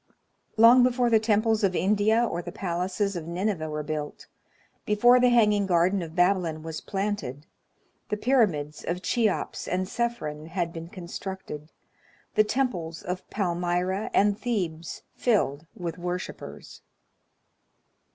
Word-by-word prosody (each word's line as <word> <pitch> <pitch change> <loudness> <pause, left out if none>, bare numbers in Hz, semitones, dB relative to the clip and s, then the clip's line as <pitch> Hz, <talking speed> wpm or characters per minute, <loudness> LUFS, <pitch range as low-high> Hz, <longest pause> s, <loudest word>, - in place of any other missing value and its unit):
Long 235 +3 +8
before 245 -1 +3
the 220 - +6
temples 220 0 +2
of 190 -2 +2
India 210 +5 +3
or 175 -6 -2
the 175 - -7
palaces 185 +1 -2
of 165 -2 -5
Nineveh 175 -2 -2
were 150 0 -3
built, 150 -1 -5 0.6
before 240 +4 +5
the 250 0 +5
hanging 210 -4 +4
garden 180 +2 +3
of 165 -1 -7
Babylon 175 -4 +2
was 160 -1 -5
planted, 195 -9 -3 0.6
the 210 - -1
pyramids 195 - +1
of 180 +2 -3
Cheops 225 -5 0
and 185 +1 -1
Cephren 185 -10 -3
had 170 -1 -2
been 165 0 -7
constructed, 175 -3 -7 0.6
the 215 - +5
temples 210 -10 -2
of 180 +1 -5
Palmyra 180 +1 -1
and 205 0 +3
Thebes 175 -9 -3
filled 165 - 0
with 170 -1 -5
worshipers. 180 +1 -6
185 Hz, 130 wpm, -26 LUFS, 170-215 Hz, 0.6 s, Long